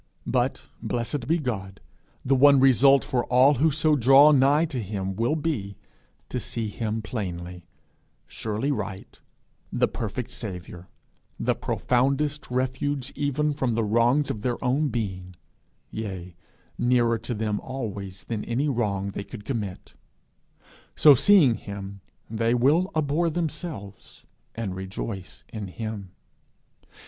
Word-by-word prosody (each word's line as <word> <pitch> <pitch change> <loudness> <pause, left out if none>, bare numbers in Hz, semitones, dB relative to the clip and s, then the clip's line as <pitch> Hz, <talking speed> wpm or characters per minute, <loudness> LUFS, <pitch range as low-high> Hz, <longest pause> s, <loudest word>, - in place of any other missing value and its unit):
But, - - -1
blessed 120 +2 -3
be 165 +3 +3
God, 100 - -4 0.5
the 135 - +3
one 140 +1 +6
result 135 +1 +5
for 125 -2 0
all 130 +3 +5
who 160 - +5
so 155 +1 +2
draw 135 +3 +7
nigh 145 +3 +4
to 135 -7 -4
him 95 -2 -4
will 115 +8 +1
be 120 - -3 0.5
to - - -2
see 115 -2 -3
him 110 +1 -3
plainly, 90 -5 -5 0.6
surely 110 +6 -3
right, 95 -8 -5 0.5
the - - +2
perfect 120 +3 -5
Saviour, 90 -5 -8 0.5
the - - +1
profoundest 140 +4 0
refuge 130 +2 -2
even 145 +1 0
from 130 -5 -1
the 115 - +1
wrongs 120 +6 +2
of 105 - -6
their 120 +1 -1
own 140 +5 +2
being, 95 -7 -4 0.6
yea, 95 -5 -6 0.4
nearer 120 -2 +2
to 120 +2 -4
them 105 -1 -1
always 100 -7 -6
than 110 -3 -4
any 130 +5 0
wrong 100 -7 -1
they 100 - -5
could 105 +1 -10
commit; 105 -8 -5 1.0
so 150 - +8
seeing 150 - +5
him, 100 -2 -7 0.3
they 115 +2 0
will 150 +10 +3
abhor 155 +2 +1
themselves, 155 - -6 0.3
and 110 -5 -3
rejoice 95 +1 -6
in 105 -3 -6
him. 105 0 -6
120 Hz, 130 wpm, -25 LUFS, 100-140 Hz, 1.0 s, so